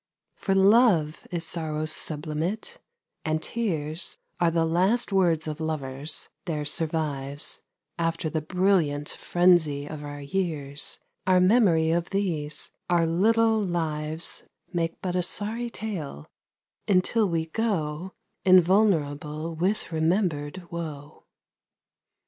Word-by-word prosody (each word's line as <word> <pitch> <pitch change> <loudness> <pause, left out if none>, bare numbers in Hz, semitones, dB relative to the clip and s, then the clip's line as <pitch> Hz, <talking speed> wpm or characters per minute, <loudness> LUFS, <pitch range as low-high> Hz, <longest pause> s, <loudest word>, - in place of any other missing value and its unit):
For 195 - 0
love 195 -6 +4
is 170 -2 -3
sorrow's 155 -2 -2
sublimate, 155 +6 -2 0.4
and 155 -1 0
tears 160 -6 -2 0.2
Are 175 -1 +4
the 165 0 +2
last 190 +7 +2
words 170 -5 +3
of 155 0 -4
lovers, 145 -2 -3 0.2
there 150 -4 -2
survives 145 -3 -2 0.4
After 165 0 0
the 155 0 -1
brilliant 165 -4 +1
frenzy 175 -5 +2
of 150 0 -7
our 145 0 -6
years, 145 -2 -3 0.3
Our 185 -1 +5
memory 180 -5 +4
of 170 +1 0
these; 170 -7 -2 0.2
our 170 -1 +3
little 220 +6 +3
lives 160 -3 -3 0.3
Make 165 -1 -1
but 180 -1 -1
a 180 - +2
sorry 220 +6 -1
tale, 170 - -5 0.6
until 200 +2 +3
we 165 -1 0
go 175 -3 -2 0.3
Invulnerable 165 -5 +3
with 185 +5 -1
remembered 165 -1 0
woe. 150 -4 -7
165 Hz, 110 wpm, -26 LUFS, 150-185 Hz, 0.6 s, Our